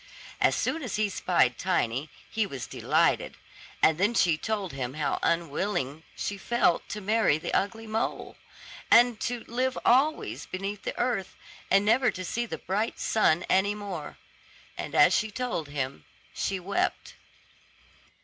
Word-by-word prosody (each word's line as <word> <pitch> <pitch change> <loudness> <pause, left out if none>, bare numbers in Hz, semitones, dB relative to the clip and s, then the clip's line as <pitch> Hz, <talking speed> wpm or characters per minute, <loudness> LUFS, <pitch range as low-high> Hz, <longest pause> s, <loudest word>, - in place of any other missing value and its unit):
As - - +3
soon 325 - -1
as 250 -7 -4
he 210 -1 +1
spied 170 -10 +1
Tiny, 150 -6 0 0.2
he 220 -2 -1
was 135 -9 -6
delighted; - - +1 0.5
and 160 +1 +5
then 210 +5 +2
she 170 -7 +4
told 200 0 -3
him 130 -1 -4
how 150 -2 -1
unwilling 165 -3 -1
she 200 -1 -4
felt 235 -5 +1
to 210 - -4
marry 210 -6 +2
the 155 - -5
ugly 225 +3 0
mole, 220 +1 -3 0.5
and 240 -1 +6
to 245 -1 -2
live 255 +3 -2
always 280 +6 +2
beneath 195 +2 -4
the - - -5
earth, 240 -6 -1 0.3
and 195 +1 +4
never 245 +4 +4
to 185 - -5
see 235 +6 -2
the 160 - -5
bright 205 +8 -2
sun 175 -6 +2
any 200 +2 +2
more. 195 -7 -6 0.6
And - - -6
as - - +6
she 220 - +1
told 210 - -3
him 135 - -4 0.3
she 195 -1 -2
wept. 195 +3 -2
200 Hz, 150 wpm, -28 LUFS, 160-225 Hz, 0.6 s, and